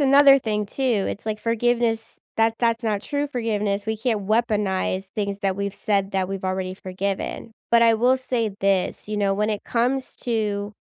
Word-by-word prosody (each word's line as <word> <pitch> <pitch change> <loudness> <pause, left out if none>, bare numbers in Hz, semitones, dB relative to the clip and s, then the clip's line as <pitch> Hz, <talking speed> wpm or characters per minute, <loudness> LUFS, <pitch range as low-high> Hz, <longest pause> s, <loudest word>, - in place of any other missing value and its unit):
another 275 0 +7
thing 210 -2 -1
too, 270 - -6 0.3
it's 205 - -5
like 215 -1 -2
forgiveness, 230 0 0 0.2
that 225 0 +3
that's 230 0 +1
not 210 -3 -1
true 290 0 -1
forgiveness, 210 -5 -1
we 220 0 -1
can't 215 -4 -1
weaponize 210 -4 0
things 200 -2 -2
that 195 -1 +1
we've 200 -1 -2
said 200 -2 0
that 190 -1 0
we've 195 -1 -4
already 185 0 -2
forgiven. 195 +4 -4 0.2
But 235 0 +6
I 230 -1 +6
will 250 +4 +3
say 245 -4 -1
this, 195 +1 0
you 210 - -2
know, 200 -1 +1
when 210 +2 0
it 210 -1 -3
comes 255 +3 -1
to 210 -3 -1
215 Hz, 180 wpm, -23 LUFS, 200-235 Hz, 0.3 s, another